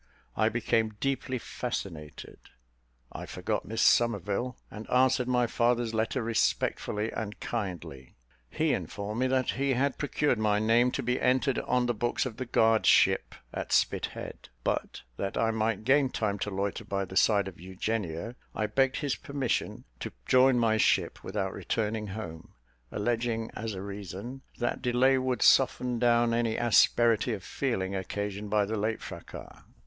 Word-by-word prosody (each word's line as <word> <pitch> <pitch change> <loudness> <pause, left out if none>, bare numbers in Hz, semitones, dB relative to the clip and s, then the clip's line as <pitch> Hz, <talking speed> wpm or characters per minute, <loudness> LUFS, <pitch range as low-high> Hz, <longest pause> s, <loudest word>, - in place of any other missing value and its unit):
I - - +3
became 110 -2 0
deeply 135 -1 -1
fascinated 85 - -6 0.7
I - - -7
forgot - - -3
Miss 110 +2 0
Somerville, 115 +2 +2
and 110 +1 -9
answered 130 0 +3
my 125 -1 +2
father's 120 0 +1
letter 115 +3 0
respectfully 110 -1 0
and 105 -2 -5
kindly. 85 - -5 0.3
He - - +1
informed 105 +2 -4
me 130 - +2
that 130 0 +1
he 135 +1 0
had 135 +2 0
procured 145 -3 +1
my 105 -1 +2
name 115 +3 +3
to - - -2
be 125 +1 0
entered 130 +1 +2
on 125 0 +1
the 120 - +1
books 120 +4 -1
of 120 -4 -5
the 130 - -4
guard 110 -1 +3
ship, - - +4 0.2
at - - -5
Spithead: - - -1
but, - - -2
that 100 - -3
I 115 0 +2
might 110 -1 -1
gain 135 +2 +4
time 105 -5 -2
to 105 - -2
loiter 100 0 -2
by 100 0 -2
the 95 - -10
side 100 -1 +4
of 95 - -9
Eugenia, 95 +2 -3 0.2
I 110 - 0
begged 130 +4 +1
his 145 -3 0
permission 140 -4 -3
to - - -6
join 130 - +5
my 115 -2 +3
ship - - +1
without 95 -1 -3
returning 110 -1 -2
home, 95 -6 -8 0.4
alleging 115 +1 -1
as 110 -1 -4
a 95 - -6
reason, 100 +6 -7 0.2
that 120 - -2
delay 130 +2 +3
would 130 -1 0
soften 125 -2 +4
down 120 -1 +3
any 115 -1 +1
asperity 120 0 +4
of 100 -4 -6
feeling 100 -6 -2
occasioned 100 +2 -4
by 105 0 +2
the 110 +2 -3
late 110 +2 -2
fracas. - - -9
115 Hz, 160 wpm, -29 LUFS, 105-125 Hz, 0.7 s, join